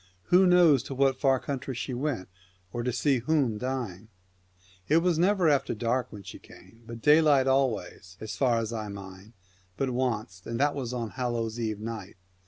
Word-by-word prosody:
Who 185 +1 +7
knows 175 -7 +5
to 135 - -6
what 135 -1 +2
far 135 -2 +3
country 135 -1 -5
she 125 +2 -4
went, 125 -6 -2 0.5
or 120 - -2
to 125 +1 -1
see 130 +2 +1
whom 130 -4 0
dying? 120 -6 -4 0.4
' 90 0 -31
It 155 - +5
was 170 -1 +2
never 185 -1 +3
after 145 -6 +2
dark 120 +3 -1
she - - -10
came, 115 - -17
but 115 0 -9
daylight 150 -3 +5
always, 110 -9 -1
as 110 - -6
far 125 -4 +2
as 115 0 -2
I 110 -2 -4
mind, 100 +1 -10 0.4
but 135 -2 -1
wanst, 115 -7 -3
and 115 +1 -3
that 145 +1 +2
was 130 -4 -4
on 120 -3 -3
a - - -16
Hallow 120 -3 -2
Eve 110 -3 -3
night. 110 -3 -7
125 Hz, 190 wpm, -28 LUFS, 110-140 Hz, 0.5 s, Who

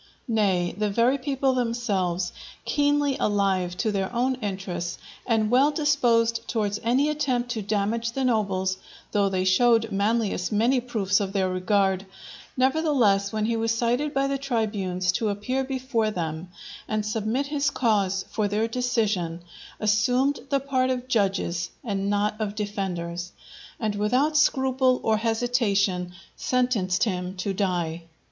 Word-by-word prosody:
Nay 195 -6 +1
the 210 +1 0
very 240 +6 +2
people 270 0 0
themselves, 205 -8 -1 0.3
keenly 290 -1 +1
alive 190 -3 +1
to 220 +1 0
their 195 -2 -1
own 245 +2 +1
interests, 185 -4 -4 0.3
and 220 -2 +2
well 265 +4 +5
disposed 245 -7 +2
towards 210 -2 -1
any 255 +6 +2
attempt 255 -5 -1
to 225 -3 -2
damage 215 +3 -1
the 270 0 -1
nobles, 190 -5 0 0.3
though 200 -2 +2
they 185 -1 0
showed 225 +4 +3
Manlius 205 -1 0
many 235 +5 +3
proofs 210 -6 0
of 195 -1 -3
their 190 -2 +1
regard, 190 0 +1 0.5
nevertheless, 255 -8 +2
when 215 -1 -1
he 230 +1 0
was 225 0 0
cited 245 +6 0
by 275 -2 +1
the 275 0 -1
tribunes 205 -8 -1
to 220 +3 -1
appear 230 +7 -1
before 260 -4 -1
them 165 -3 -4 0.4
and 215 -1 -1
submit 220 +5 -1
his 290 0 0
cause 200 -7 +1
for 215 -2 0
their 210 +3 0
decision, 215 -9 -1 0.4
assumed 245 +7 +2
the 275 - +2
part 260 -1 0
of 255 -1 -2
judges 190 -5 0
and 200 -4 -2
not 210 +1 0
of 205 -1 -2
defenders, 180 -4 -4 0.5
and 215 -3 -1
without 250 +9 +1
scruple 260 -3 +3
or 220 -1 +2
hesitation 215 -6 0 0.2
sentenced 240 -8 +1
him 185 -3 -2
to 195 +2 -2
die. 175 -4 -1
215 Hz, 140 wpm, -25 LUFS, 195-250 Hz, 0.5 s, well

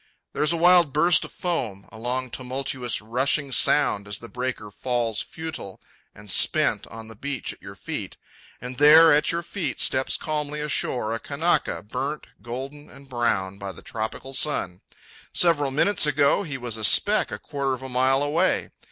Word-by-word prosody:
There - - -3
is 150 +1 +4
a 170 - 0
wild 175 -3 +5
burst 165 +2 +4
of - - -11
foam, 115 - -4
a 110 - -12
long 125 +2 -3
tumultuous 130 -3 -3
rushing 135 +5 0
sound 105 -7 +2
as 100 -1 -3
the 115 - -10
breaker 125 -4 -5
falls 120 -1 -1
futile 160 -12 -8 0.4
and 105 -2 -8
spent - - +2
on 110 +1 -10
the 110 - -11
beach 135 +3 -4
at - - -21
your - - -10
feet; - - -6 0.4
and 125 +1 -7
there, 155 +2 +8
at 150 0 +2
your 170 +1 -2
feet 180 +1 -4
steps 130 0 +1
calmly 150 -1 -3
ashore 125 -6 -1
a 115 - -3
Kanaka, 155 +1 -1
burnt, 135 +7 -4 0.2
golden 135 +6 -7
and 140 0 -16
brown 100 -6 -1
by 100 -1 -5
the - - -14
tropic 110 -1 -5
sun. 95 -11 0 0.5
Several 150 -5 +2
minutes 155 +5 +3
ago 145 +4 +3
he 150 -8 -5
was 120 -3 -4
a 110 - -5
speck - - +4
a - - -4
quarter 140 -2 -3
of 130 0 -6
a - - -5
mile 130 +2 +2
away. 145 +3 0
130 Hz, 180 wpm, -24 LUFS, 115-150 Hz, 0.5 s, there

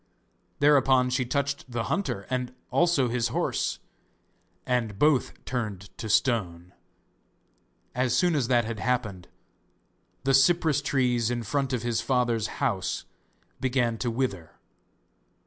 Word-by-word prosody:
Thereupon 135 -3 +4
she 125 0 0
touched 140 0 -2
the 120 -1 -2
hunter 105 - -2
and 125 0 -2 0.2
also 170 -7 +3
his 120 0 0
horse, - - -1 0.9
and 115 -5 -1
both 145 +1 +1
turned 105 -6 -4
to 110 - -5
stone. 100 -7 0 1.2
As 125 0 +1
soon 175 +3 +3
as 135 -6 +1
that 120 -2 +3
had 115 -1 -5
happened, 105 -5 -2 1.0
the 135 0 +2
cypress 150 +1 +4
trees 125 -5 +1
in 120 -1 -2
front 135 +5 -1
of 125 -3 -2
his 120 -1 0
father's 120 -4 +1
house - - -1 0.5
began 120 -3 0
to 120 - -1
wither. 115 -9 -3
125 Hz, 125 wpm, -27 LUFS, 115-135 Hz, 1.2 s, Thereupon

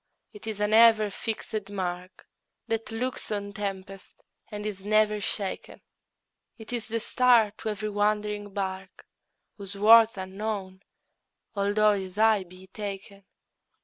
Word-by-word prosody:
it 210 +1 -11
is 215 -2 -4
an 210 +1 0
ever 220 -2 +6
fixed 215 -1 -4
mark 185 -2 -5 0.4
That 225 -1 -3
looks 245 +2 -4
on 200 -1 -3
tempests 195 -1 -6 0.3
and 210 0 -6
is 200 -3 -5
never 210 0 +2
shaken; 195 -1 -4 0.8
It 220 +2 -9
is 235 -2 -3
the 230 +1 -2
star 235 -2 +3
to 220 - -3
every 215 0 -3
wandering 210 0 -1
bark, 190 -1 -5 0.5
Whose 200 -1 -7
worth's 225 +1 +7
unknown, 190 0 -5 0.7
although 205 +1 +3
his 190 -2 -5
height 215 -4 +3
be 185 +1 -14
taken. 200 0 -8
210 Hz, 130 wpm, -27 LUFS, 195-215 Hz, 0.8 s, worth's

